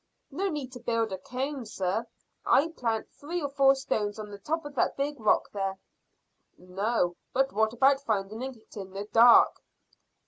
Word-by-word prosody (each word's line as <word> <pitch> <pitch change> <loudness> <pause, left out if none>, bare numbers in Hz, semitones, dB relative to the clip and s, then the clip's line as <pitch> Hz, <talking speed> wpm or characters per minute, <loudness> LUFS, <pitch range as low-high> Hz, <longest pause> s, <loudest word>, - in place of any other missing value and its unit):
"No 385 +8 -1
need 290 -6 -4
to 250 - -9
build 230 -2 -1
a 190 - -4
cairn, 265 +4 -4
sir, 205 +3 -2
if - - -24
I 305 +4 +4
plant 230 -8 -3
three 335 +5 -5
or 285 -3 -3
four 275 -1 +4
stones 215 -6 -2
on 210 -1 -7
the 200 - -9
top 315 +9 -3
of 290 - -7
that 265 - 0
big 285 0 -2
rock 215 -2 +2
there." 195 -1 -3 0.8
"No; 180 0 -1 0.2
but 270 +1 +1
what 220 +1 +2
about 270 +3 +3
finding 215 -2 -2
it 255 -4 -8
in 190 -2 -8
the 200 +1 -5
dark?" 230 +3 +6
235 Hz, 180 wpm, -28 LUFS, 205-275 Hz, 0.8 s, dark